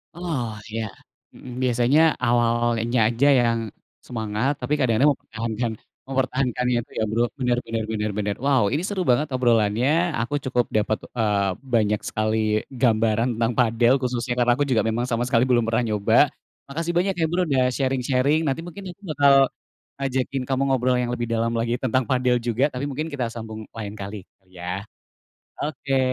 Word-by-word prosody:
Oh, 155 -10 -3 0.2
iya. 115 0 -2 0.5
Mhm, 125 - -11
biasanya 125 +4 +3 0.3
awalnya 120 0 +1
aja 120 +5 +2
yang 115 -1 +2 0.5
semangat, 110 +3 -1
tapi 150 - -2
kadang-kadang 130 +1 +3
mempertahankan 115 +1 -4 0.4
mempertahankannya 130 -2 0
itu - - -28
ya, - - +1
Bro, 115 +2 +2 0.2
bener 125 -1 +1
bener 115 -1 -2
bener 105 -1 -1
bener. 105 -1 -1
Wow, 135 -5 +3
ini 155 +5 0
seru 195 -1 -2
banget 130 +5 +3
obrolannya, 125 +7 +2
aku 125 +5 -2
cukup 125 -2 +1
dapet, 110 0 +1 0.2
eee, 105 -4 +1 0.2
banyak 105 -2 +2
sekali 110 +1 -1 0.3
gambaran 115 -2 +1
tentang 115 +1 +1
padel, 120 0 +3
khususnya, 125 -1 -1
karena 120 0 +3
aku 145 - +1
juga 115 -5 +2
memang 115 +2 0
sama 120 0 0
sekali 125 0 +2
belum 120 -2 +3
pernah 115 +2 +1
nyoba, 105 -2 +2 0.5
makasih 165 +5 -3
banyak 190 +2 +2
ya, 165 -2 +1
Bro, 180 +1 +1
udah 130 -3 +2
sharing-sharing, 135 +3 +1
nanti 140 0 -1
mungkin 185 +3 -9
aku 185 - -19
bakal 140 0 +5 0.7
ngajakin 135 0 -1
kamu 135 0 0
ngobrol 130 -1 +2
yang 120 0 -1
lebih 120 -1 -3
dalam 115 0 0
lagi 115 +1 -1
tentang 130 0 +1
padel 125 -1 +2
juga, 120 +4 +1
tapi 125 +2 -4
mungkin 155 +4 -3
kita 130 -7 -3
sambung 110 -1 -7
lain 105 -3 -6
kali, 100 -1 -7
gitu 95 - -42
ya. 90 +3 -4 0.8
Oke, 140 -2 -1
120 Hz, 165 wpm, -23 LUFS, 115-135 Hz, 0.8 s, bakal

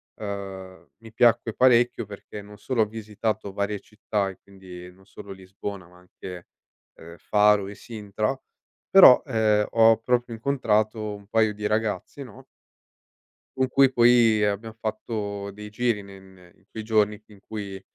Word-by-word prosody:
uhm, 95 -2 -8
mi 115 +1 -15
piacque 115 -1 +3
parecchio 120 -3 +3
perché 105 0 -10
non 105 0 -14
solo 130 -4 -1
ho - - +4
visitato 110 -1 -4
varie 100 +1 -2
città, 105 -2 -3
e 95 - -12
quindi 90 -2 -12
non 95 +1 -22
solo 100 0 -12
Lisbona, 95 0 -8
ma 90 +1 -20
anche, 90 0 -11 0.5
uhm, 85 +1 -13
Faro 105 -1 +3
e 100 - -9
Sintra, 110 +2 -4 0.5
però, 185 -10 +8
ehm, 105 -2 +1
ho 115 -1 +5
proprio 120 +1 -1
incontrato 110 -3 -1
un 100 -1 -12
paio 110 0 +2
di 105 0 -3
ragazzi, 105 +5 -3
no 120 -6 -14 1.1
con 130 0 +2
cui 135 0 +4
poi 120 -3 +4
abbiam 105 +2 -3
fatto 105 -2 -4
dei 105 +1 -10
giri 115 0 -1
ne 100 0 -13
ne 95 -2 -19
in 95 - -30
quei 110 - -7
giorni 105 -1 +1
in 105 -2 -17
cui, 100 -3 -7
105 Hz, 155 wpm, -24 LUFS, 100-115 Hz, 1.1 s, però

